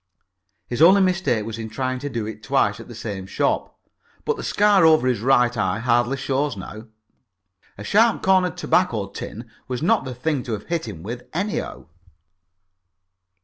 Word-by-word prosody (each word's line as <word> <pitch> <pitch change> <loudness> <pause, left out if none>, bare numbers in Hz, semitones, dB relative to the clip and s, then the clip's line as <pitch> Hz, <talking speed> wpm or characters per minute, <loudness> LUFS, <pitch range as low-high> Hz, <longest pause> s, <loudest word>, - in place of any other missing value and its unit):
His 120 +4 -4
only 190 +5 +7
mistake 180 - +1
was 115 0 -6
in 110 -1 -5
trying 130 +2 -3
to 145 +2 -4
do 115 -5 -3
it 110 0 -7
twice - - +1
at - - -10
the - - -10
same 95 -2 -6
shop, - - -1 0.5
but - - +1
the - - -7
scar 205 -3 +3
over 155 -5 +5
his 125 -4 +1
right 125 0 +3
eye 95 -3 0
hardly 120 +3 +1
shows 135 -2 -1
now. 105 +4 -9 0.9
A 100 - -8
sharp 225 - +3
cornered 185 -2 +3
tobacco 120 - +1
tin 115 +3 -8 0.2
was 125 +2 -4
not 220 +5 +3
the 130 -1 -6
thing 140 +2 -1
to 120 - -5
have 105 - -5
hit 165 -7 -2
him 85 -7 -8
with 120 +4 -7
anyhow. 195 +5 -3
125 Hz, 175 wpm, -22 LUFS, 110-165 Hz, 0.9 s, only